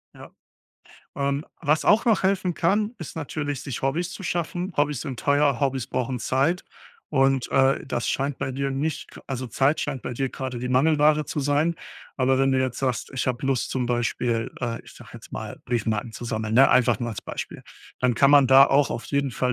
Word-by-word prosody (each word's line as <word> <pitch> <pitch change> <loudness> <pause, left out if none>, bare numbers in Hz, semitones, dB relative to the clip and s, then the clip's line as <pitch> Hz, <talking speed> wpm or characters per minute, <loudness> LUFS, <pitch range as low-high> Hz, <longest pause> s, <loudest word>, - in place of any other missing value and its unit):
Ja. - - -12 0.9
Ähm, 140 +1 -1 0.2
was 155 0 +1
auch 215 +2 +4
noch 220 -4 +3
helfen 190 -2 +1
kann, 210 +6 +1
ist 160 - -8
natürlich, 145 -2 -4
sich 135 -3 -5
Hobbys 165 +7 -1
zu 195 - -8
schaffen. 175 +2 -3
Hobbys 145 -2 0
sind 135 -6 -6
teuer, 145 -3 +2
Hobbys 135 -4 0
brauchen 130 0 -2
Zeit 140 +10 0 0.5
und, 135 -3 +2
äh, 135 0 +3
das 120 -3 -2
scheint 135 0 -1
bei 130 - -3
dir 135 +1 -2
nicht 145 +3 -4
also, 130 -2 -4
Zeit 135 +6 +1
scheint 135 -4 -3
bei 125 - -4
dir 135 +2 -1
grade 130 -2 -5
die 125 +1 -4
Mangelware 150 +2 +3
zu 150 - -3
sein. 145 +4 +1 0.4
Aber 130 0 +2
wenn 135 0 +3
du 130 - +2
jetzt 130 -2 -1
sagst: 130 -3 -2
„Ich 130 - -2
habe 125 +1 -2
Lust“, 135 -3 0
zum 130 -2 -1
Beispiel, 120 -1 -1
äh, 115 -1 -2
ich - - -15
sage - - -14
jetzt - - -12
mal, - - -6
„Briefmarken 110 -1 -1
zu 120 - -8
sammeln“, 110 -1 -2
ne, 135 +2 +7
einfach 120 -1 +4
nur 120 -1 -2
als 105 - -6
Beispiel. - - -6 0.4
Dann 125 -2 +2
kann 140 +4 +4
man 140 -2 +7
da 135 +1 +8
auch 140 +1 +3
auf - - -4
jeden 140 -1 0
Fall 125 +1 0
135 Hz, 205 wpm, -24 LUFS, 125-150 Hz, 0.9 s, da